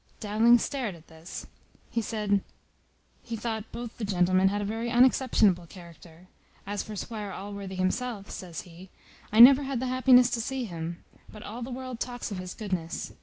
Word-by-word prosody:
Dowling 225 +3 +5
stared 240 -6 -3
at 165 -1 -17
this. 160 +2 -9 0.5
He 230 - 0
said, 210 -2 0 0.8
"He 230 - -6
thought 220 -1 -4
both 240 -1 -7
the - - -4
gentlemen 185 -1 +3
had 205 +2 0
a 205 - -2
very 225 +3 -3
unexceptionable 240 -7 +3
character. 170 -1 -14 0.4
As 205 +1 -3
for 215 - -8
Squire 210 0 -5
Allworthy 200 -1 -7
himself," 200 +3 -2
says 175 -4 -6
he, 180 +2 -14 0.4
"I 215 - +2
never 265 +4 +10
had 270 -3 -2
the 260 - -2
happiness 255 -1 +5
to 235 - -1
see 265 +2 -3
him; 170 -3 -6 0.3
but 215 - -11
all 230 +4 -7
the 240 - -5
world 255 -1 -6
talks 245 -2 -4
of 195 - -4
his 185 0 -7
goodness. 185 -6 -4
210 Hz, 175 wpm, -28 LUFS, 185-240 Hz, 0.8 s, never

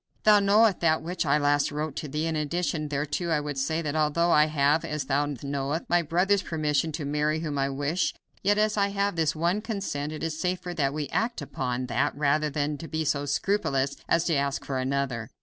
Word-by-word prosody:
Thou 210 -1 +7
knowest 205 0 +4
that 160 -2 +2
which 170 -1 -2
I 140 +2 +4
last 145 -1 +2
wrote 150 0 -3
to 155 - -4
thee, 150 +3 -2
and 165 -1 -1
in 155 - 0
addition 155 -1 -2
thereto 150 +4 -2
I 160 -2 +2
would 145 -2 -4
say 160 +5 -1
that 150 -1 -2
although 155 +3 +2
I 150 -1 +6
have, 150 +1 +2
as 150 -2 -3
thou 145 +2 +1
likewise 145 -3 -6
knowest, 140 +3 -2
my 175 0 +4
brother's 180 +5 +2
permission 155 -2 0
to 150 -1 -4
marry 150 +2 0
whom 150 -4 -3
I 135 0 +1
wish, 145 +6 -1 0.3
yet 205 +1 +2
as 215 0 +2
I 200 -1 +3
have 200 -2 -1
his 160 -1 +1
one 170 +6 0
consent 195 -10 -3
it 155 - -6
is 160 -1 -3
safer 180 -1 -2
that 140 -4 0
we 150 -2 -2
act 235 +1 -1
upon 130 -3 -3
that 140 +3 0
rather 150 +1 +2
than 145 0 -2
be 160 +1 -3
so 145 -1 0
scrupulous 140 -4 0
as 165 0 +3
to 170 - 0
ask 140 -1 -1
for 135 -2 -2
another. 130 -3 -2
150 Hz, 220 wpm, -27 LUFS, 145-170 Hz, 0.3 s, Thou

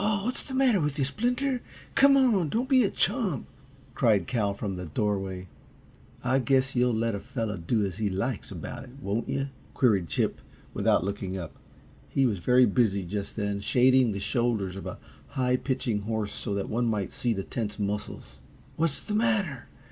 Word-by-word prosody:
"Aw, 205 -1 +1
what's 250 - -1
the 265 - -6
matter 255 -8 +4
with 150 -1 -1
yuh, 140 - +2
Splinter! 245 - 0 0.3
Come 275 0 +6
on; 220 - +3
don't 235 - 0
be 260 -2 +5
a 200 - +2
chump," 200 - 0 0.5
cried 105 -6 +3
Cal, 105 -3 0
from 100 -2 -3
the 90 -1 -6
doorway. 95 +1 -2 0.8
"I 130 +2 +2
guess 135 0 +2
you'll 125 -1 +3
let 115 0 0
a 100 - -2
fellow 115 -3 -3
do 100 +5 0
as 95 -1 -4
he 105 -2 +1
likes 100 +4 -2
about - - -6
it, - - -12
won't 110 -2 -2
you?" 140 0 -1 0.3
queried 100 -9 +3
Chip, - - 0 0.3
without - - +2
looking 95 -1 -3
up. 85 -3 -7 0.5
He 135 - +2
was 105 -7 0
very 125 +6 +5
busy, 105 -3 +2
just 100 +3 -4
then, 100 -2 -1
shading 125 +3 +4
the 100 - -3
shoulders 110 -3 0
of 95 - -6
a - - -6 0.4
high 125 -1 +2
pitching 125 -6 -1
horse 110 -1 -2
so 100 - -3
that 100 - -2
one 120 +2 0
might 105 -4 -1
see 120 - -1
the 95 -2 -3
tense 105 -1 -4
muscles. 105 0 -4 0.4
"What's 160 -3 +1
the 210 - -5
matter? 205 - +1
120 Hz, 185 wpm, -28 LUFS, 100-140 Hz, 0.8 s, Come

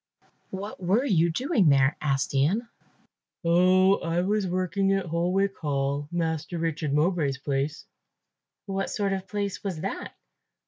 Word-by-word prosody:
"What 195 +1 -7
were 200 +9 +2
you 170 - +3
doing 215 - +2
there?" 135 0 +4
asked 135 -3 0
Ian. 175 - +1 0.8
"Oh, 185 +3 +5
I 170 +1 -1
was 200 +1 0
working 185 +2 0
at 195 -1 0
Holwick 180 +4 0
Hall, 140 -1 -1
Master 165 -1 -2
Richard 160 -2 -2
Mowbray's 150 -2 +1
place." 140 +2 -2 0.8
"What 195 -1 -2
sort 200 -2 -1
of 190 - -2
a - - -29
place 200 -1 -3
was 185 -6 -4
that?" - - -5
175 Hz, 140 wpm, -26 LUFS, 150-195 Hz, 0.8 s, Oh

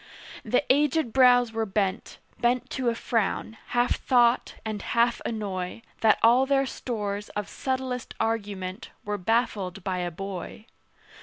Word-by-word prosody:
The 245 +5 +1
aged 290 -3 +1
brows 245 -2 +5
were 225 0 -1
bent, 195 -1 -1 0.2
Bent 240 +1 +1
to 255 -2 0
a 230 - -1
frown, 225 -1 -1
half 245 0 +1
thought, 240 -1 +3
and 215 -2 -3
half 235 0 +1
annoy, 200 -2 -4 0.2
That 220 -1 +5
all 245 +4 +5
their 275 0 +3
stores 210 -6 -4
of 210 - -2
subtlest 260 -2 -3
argument 205 -2 -3 0.2
Were 205 0 -2
baffled 195 -3 0
by 185 -1 -2
a 175 0 -1
boy. 195 +4 -7
225 Hz, 140 wpm, -26 LUFS, 200-245 Hz, 0.2 s, brows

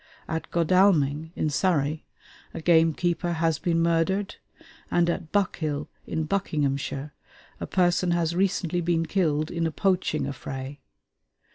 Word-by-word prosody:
At 160 0 -4
Godalming, 165 -4 +3
in 155 - -1
Surrey, 150 0 0 0.5
a - - -3
gamekeeper 170 +1 +2
has 165 -2 0
been 165 -2 +1
murdered; 170 +4 0 0.5
and 175 -1 +2
at 160 -2 -5
Buckhill, 160 -7 -1 0.2
in 160 - -2
Buckinghamshire, 145 -5 -2 0.5
a - - -4
person 180 -1 +2
has 170 -1 +1
recently 180 -2 0
been 165 -1 +1
killed 155 -3 0
in 170 -1 0
a - - -3
poaching 175 -4 0
affray. 135 0 -6
165 Hz, 125 wpm, -26 LUFS, 150-175 Hz, 0.5 s, Godalming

